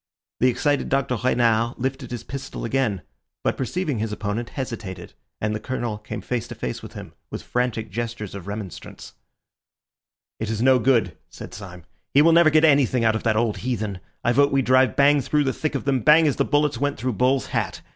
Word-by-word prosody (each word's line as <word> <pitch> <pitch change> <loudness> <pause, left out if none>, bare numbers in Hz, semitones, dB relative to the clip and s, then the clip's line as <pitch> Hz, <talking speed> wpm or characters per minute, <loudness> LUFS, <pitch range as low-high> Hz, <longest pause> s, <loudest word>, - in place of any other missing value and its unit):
The 125 - +4
excited 145 +3 +1
Dr. 135 -2 +1
Renard 115 -1 +1
lifted 130 0 -3
his 120 -2 -6
pistol 135 0 -6
again, 115 -7 0 0.4
but - - +1
perceiving 145 -1 -2
his 110 0 -2
opponent, 105 +3 -3
hesitated, 105 -9 -6 0.3
and 105 0 -1
the 105 - -3
Colonel 120 -2 -3
came 110 +1 -7
face 125 -2 -3
to - - -8
face 60 - -4
with - - -10
him - - -9 0.2
with - - -6
frantic 120 -4 -2
gestures 115 -1 -4
of 100 -1 -8
remonstrance. 100 -3 -8 1.3
"It 110 - -3
is 110 -1 -2
no 130 +1 +5
good," 115 -8 +2
said - - -10
Syme. 90 -4 -10 0.3
"He 145 - +7
will 165 +1 +5
never 170 -1 +6
get 155 +1 +4
anything 135 -5 +3
out 110 0 +3
of 110 - -2
that 110 -2 +1
old 115 -2 +1
heathen. 110 -6 -3 0.2
I 120 - +3
vote 140 +3 +3
we 135 -1 +2
drive 130 +1 +3
bang 145 0 +5
through 150 +3 +1
the 135 -2 0
thick 155 -2 -3
of 135 - -3
them, 135 -2 +2
bang 155 +7 +6
as 145 - +1
the - - +2
bullets 145 -3 +1
went 145 +1 -1
through 125 +3 -2
Bull's 125 +4 +2
hat. - - -2
125 Hz, 205 wpm, -23 LUFS, 110-135 Hz, 1.3 s, He